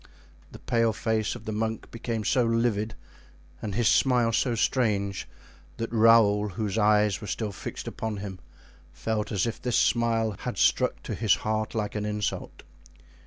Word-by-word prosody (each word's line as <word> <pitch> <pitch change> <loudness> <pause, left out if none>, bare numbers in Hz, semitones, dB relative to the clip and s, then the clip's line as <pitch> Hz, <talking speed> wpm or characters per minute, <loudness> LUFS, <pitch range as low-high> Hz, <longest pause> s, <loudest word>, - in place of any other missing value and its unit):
The - - -10
pale 115 -2 +1
face 110 0 -1
of - - -10
the 110 - -3
monk 110 +1 -3
became 115 -1 -3
so 125 +4 +2
livid 115 -2 0 0.7
and 105 -3 -4
his 120 -1 +2
smile 125 -3 +3
so 120 +1 +1
strange, 105 -5 0 0.5
that 115 -1 -4
Raoul, 110 -2 +5
whose 100 +1 -3
eyes 105 -2 +3
were 105 - -7
still 105 +3 -3
fixed 95 - -7
upon 110 -2 -4
him, 95 -2 -6 0.5
felt 110 -1 -3
as 100 -1 +1
if 115 - -4
this 125 -2 0
smile 115 -2 +2
had - - -4
struck - - +2
to - - -4
his 105 -5 +3
heart 110 +1 -1
like 105 -2 -2
an 105 -1 -3
insult. 105 -1 -3
110 Hz, 165 wpm, -27 LUFS, 105-115 Hz, 0.7 s, Raoul